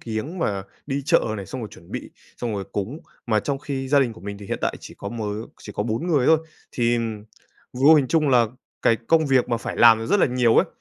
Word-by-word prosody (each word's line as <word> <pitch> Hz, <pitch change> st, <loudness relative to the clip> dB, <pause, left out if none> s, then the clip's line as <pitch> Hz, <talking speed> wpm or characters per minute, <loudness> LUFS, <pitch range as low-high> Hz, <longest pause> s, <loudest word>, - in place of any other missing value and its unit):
kiếng 120 Hz, +11 st, -4 dB
và 100 Hz, -10 st, -1 dB, 0.2 s
đi 140 Hz, 0 st, -2 dB
chợ 165 Hz, +2 st, +4 dB, 0.2 s
này, 100 Hz, -2 st, -6 dB
xong 130 Hz, -, -6 dB
rồi 110 Hz, -, -5 dB
chuẩn 85 Hz, -5 st, -16 dB
bị, -, -, -5 dB, 0.3 s
xong 115 Hz, -3 st, -3 dB
rồi 100 Hz, -1 st, -3 dB
cúng, 110 Hz, +10 st, -3 dB, 0.3 s
mà 110 Hz, -2 st, +2 dB
trong 140 Hz, +3 st, -2 dB
khi 135 Hz, -2 st, -4 dB
gia 140 Hz, 0 st, +5 dB
đình 120 Hz, -4 st, +1 dB
của 110 Hz, -, -14 dB
mình 100 Hz, 0 st, -6 dB
thì 100 Hz, -, -10 dB
hiện -, -, -3 dB
tại -, -, -1 dB
chỉ -, -, -11 dB
có 100 Hz, -, -5 dB
mớ 115 Hz, -1 st, -5 dB, 0.4 s
chỉ 105 Hz, -, -9 dB
có 105 Hz, -, -2 dB
4 115 Hz, +9 st, -2 dB
người 145 Hz, -7 st, +2 dB
thôi. 160 Hz, -1 st, +6 dB, 0.3 s
Thì 120 Hz, -1 st, +1 dB, 0.7 s
vô 140 Hz, +5 st, +6 dB
hình 140 Hz, -4 st, +3 dB
trung 155 Hz, -3 st, +2 dB
là 120 Hz, -3 st, +5 dB, 0.4 s
cái 115 Hz, -, +4 dB
công 160 Hz, +7 st, +2 dB
việc 130 Hz, -2 st, +3 dB
mà 120 Hz, -, +1 dB
phải -, -, -5 dB
làm 115 Hz, -1 st, +6 dB
rất 200 Hz, +2 st, +2 dB
là -, -, +5 dB
nhiều 125 Hz, -2 st, +2 dB
ấy, -, -, +5 dB
120 Hz, 250 wpm, -23 LUFS, 110-140 Hz, 0.7 s, thôi